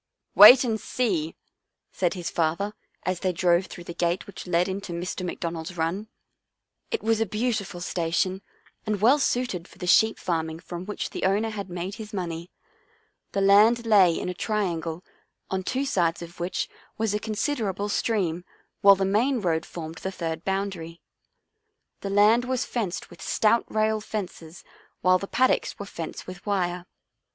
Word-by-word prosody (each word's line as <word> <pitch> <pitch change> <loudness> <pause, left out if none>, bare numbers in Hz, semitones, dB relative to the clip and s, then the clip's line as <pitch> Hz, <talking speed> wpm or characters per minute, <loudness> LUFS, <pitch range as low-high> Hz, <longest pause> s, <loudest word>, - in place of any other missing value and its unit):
" - - -59
Wait 255 +1 +11
and 225 -3 -1
see," 185 -11 -1 0.6
said 180 -1 0
his 175 -2 -4
father 170 +6 0 0.3
as 185 -1 -1
they 185 - 0
drove 175 +1 +2
through 175 - -9
the 170 - -7
gate 175 +1 -1
which 200 - -10
led 175 0 +2
into 195 -1 -4
Mr. 180 +2 -4
McDon 170 -1 -3
ald's 165 +2 -7
run. 170 +7 -1 0.8
It 455 - -2
was 225 0 +2
a - - +3
beautiful 210 -4 -2
station 180 +2 -1 0.4
and 210 -2 -1
well 250 +8 +5
suited 245 -10 -1
for - - -18
the - - -5
sheep 220 +5 +4
farming 160 -2 -2
from 180 +1 -7
which 210 - -4
the - - -5
owner 205 +4 +1
had 200 -3 -6
made 180 +2 -4
his 215 0 -9
money. 170 -2 -4 0.8
The 195 - 0
land 215 +4 +5
lay 195 -6 +5
in - - -4
a 180 - -2
triangle, 175 -5 -2 0.5
on 190 0 0
two 260 +8 -1
sides 175 -10 0
of 170 +1 -12
which 175 +1 -2 0.3
was 220 -2 0
a 210 - 0
considerable 215 -2 -2
stream 190 -6 0 0.4
while 200 0 +8
the 195 0 0
main 235 +7 +2
road 170 -5 0
formed 165 -1 -7
the 190 - -4
third 165 -3 -4
boundary. 190 -4 -3 1.0
The 200 - -5
land 210 +4 +4
was 255 -1 -1
fenced 205 -7 -3
with - - -13
stout 230 +2 +2
rail 215 0 +1
fences 180 -6 -6 0.4
while 185 0 +4
the 195 - -5
paddocks 255 +5 +1
were 200 - -6
fenced 170 -5 -7
with 185 +1 -9
wire. 180 -3 -1
190 Hz, 170 wpm, -26 LUFS, 175-215 Hz, 1.0 s, Wait